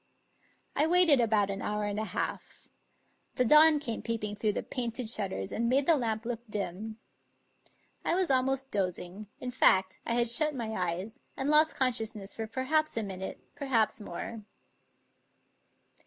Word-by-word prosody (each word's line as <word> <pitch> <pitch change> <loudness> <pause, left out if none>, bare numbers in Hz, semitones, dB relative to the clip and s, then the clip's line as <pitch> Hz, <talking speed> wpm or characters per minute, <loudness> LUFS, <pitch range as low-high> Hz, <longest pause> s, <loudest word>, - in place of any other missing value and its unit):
I 300 - +3
waited 335 -6 +7
about 210 -3 +2
an 195 0 -5
hour 210 0 -2
and 205 0 -2
a 215 - -2
half. - - -5 0.7
The 250 - +2
dawn 305 +4 +7
came 245 -6 -4
peep 230 -2 -3
ing 210 0 -3
through 210 0 0
the - - -3
painted 240 -1 -3
shutters 195 - -2
and 235 +1 -1
made 270 +2 +2
the 330 - +5
lamp 225 -4 -2
look 235 -1 -3
dim. 210 +2 -5 1.1
I 335 - +1
was 365 -4 +1
almost 265 +1 0
dozing 190 +1 -3
— - - -42
in 250 - -5
fact, 190 -6 +3
I 235 - -1
had 240 0 +2
shut 305 +5 +2
my 230 -3 -4
eyes, 185 +2 -3 0.2
and 270 +2 -1
lost 310 +1 +4
consciousness 225 -6 -1
for 225 -1 -5
perhaps 275 +5 0
a 225 - 0
minute, 190 -1 -6
perhaps 250 -4 0
more. 210 +4 -7
230 Hz, 165 wpm, -29 LUFS, 210-265 Hz, 1.1 s, waited